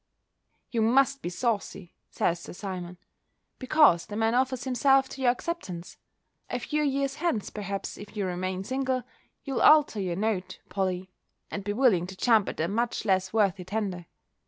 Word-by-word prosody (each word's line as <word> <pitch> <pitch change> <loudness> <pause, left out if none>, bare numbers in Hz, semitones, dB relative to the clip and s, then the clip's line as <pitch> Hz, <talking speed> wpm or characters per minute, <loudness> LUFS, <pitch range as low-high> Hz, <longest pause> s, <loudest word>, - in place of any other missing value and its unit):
"You 230 - 0
must 270 +4 +3
be - - -3
saucy," 200 -3 -2 0.2
says 170 0 0
Sir - - -9
Simon, 180 -2 -6 0.6
"because 260 - +4
the 205 - -6
man 225 +1 +1
offers 260 0 +1
himself 270 +1 +3
to 270 - -8
your 250 - +4
acceptance. 245 - -4 0.5
A - - -1
few 300 0 -1
years 275 -1 0
hence, 310 - -1
perhaps, 200 -2 -5
if 205 +1 -10
you 200 - 0
remain 185 +1 -3
single, 260 +2 -1 0.4
you'll 270 -3 -2
alter 295 -9 +6
your 180 -2 -2
note, 200 -2 -2
Polly, 185 -1 -2 0.4
and 200 - -4
be 205 +1 -2
willing 210 -8 +3
to 190 0 -9
jump 225 -3 +3
at - - -7
a 160 - +1
much 230 +3 -1
less 190 -2 +1
worthy 200 -4 +1
tender." 185 -3 -3
215 Hz, 165 wpm, -28 LUFS, 185-260 Hz, 0.6 s, alter